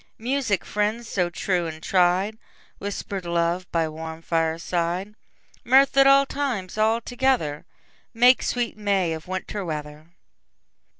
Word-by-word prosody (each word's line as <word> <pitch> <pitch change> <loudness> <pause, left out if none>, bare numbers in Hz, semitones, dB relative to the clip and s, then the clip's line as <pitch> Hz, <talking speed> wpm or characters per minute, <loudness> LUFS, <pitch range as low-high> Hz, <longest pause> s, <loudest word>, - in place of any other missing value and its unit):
Music, 240 -4 -1
friends 215 +3 -1
so 180 -4 0
true 175 0 -1
and 160 0 -8
tried, 190 +4 +2 0.4
Whisper'd 200 -1 -5
love 170 +1 -1
by 165 -1 +1
warm 160 +1 -7
fireside, 170 +4 -1 0.5
Mirth 265 +3 +4
at 275 0 +6
all 275 0 +6
times 255 -11 -3
all 220 +2 +2
together, 245 - 0 0.5
Make 245 +2 +5
sweet 245 -2 -1
May 200 -5 0
of 160 +1 -8
Winter 185 +2 -4
weather. 150 -2 -6
190 Hz, 125 wpm, -24 LUFS, 170-230 Hz, 0.5 s, at